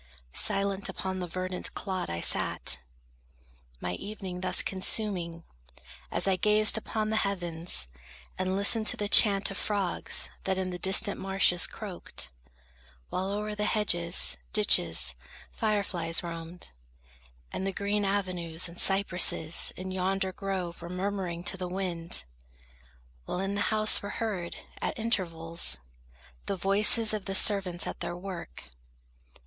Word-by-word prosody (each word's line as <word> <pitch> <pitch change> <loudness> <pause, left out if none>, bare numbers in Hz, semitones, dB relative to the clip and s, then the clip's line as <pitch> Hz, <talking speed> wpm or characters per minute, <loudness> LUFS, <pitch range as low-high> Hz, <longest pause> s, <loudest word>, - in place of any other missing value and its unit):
Silent 195 0 -1
upon 190 0 -5
the 180 - -4
verdant 185 +1 -4
clod 190 -2 -4
I 85 0 -4
sat, - - +2 1.0
My 90 +5 -4
evening 190 - -7
thus 185 - +1
consuming, 185 -4 +1 0.7
as - - +2
I 190 -1 +2
gazed 210 +2 +3
Upon 215 0 -3
the 220 - 0
heavens, 175 - 0 0.5
and 185 0 -2
listened 215 +2 +5
to - - +2
the 205 - -2
chant 200 -1 +7
Of 195 - -6
frogs 200 -4 +1
that 190 0 0
in 185 -1 -3
the 180 - -6
distant 195 +2 +5
marshes 190 -2 +2
croaked; 180 - -6 0.8
While 190 +1 -2
o'er 210 +1 -3
the 210 0 -2
hedges, 175 -6 +1 0.2
ditches, 85 - +3 0.4
fire 215 -2 -1
flies 165 -3 -1
roamed, 165 - -7 0.8
And 190 - -4
the - - 0
green 205 +1 -2
avenues 185 -4 0
and 170 +1 0
cypresses 180 -4 +3
In 185 +1 -7
yonder 190 +1 -1
grove 185 -4 -5
were 170 - -8
murmuring 180 -2 -4
to 190 - -1
the 180 -1 -5
wind; 180 -2 -1 1.0
While 180 - -4
in 195 +1 -2
the 200 - -2
house 215 0 +4
were 200 - -6
heard, 195 -7 -4 0.3
at - - -3
intervals, 165 - +1 0.7
The 200 - -1
voices 210 +4 +4
of 210 -2 -4
the 195 - -3
servants 190 -4 +3
at - - -6
their 175 0 -5
work. 180 - -8
190 Hz, 140 wpm, -28 LUFS, 175-200 Hz, 1.0 s, chant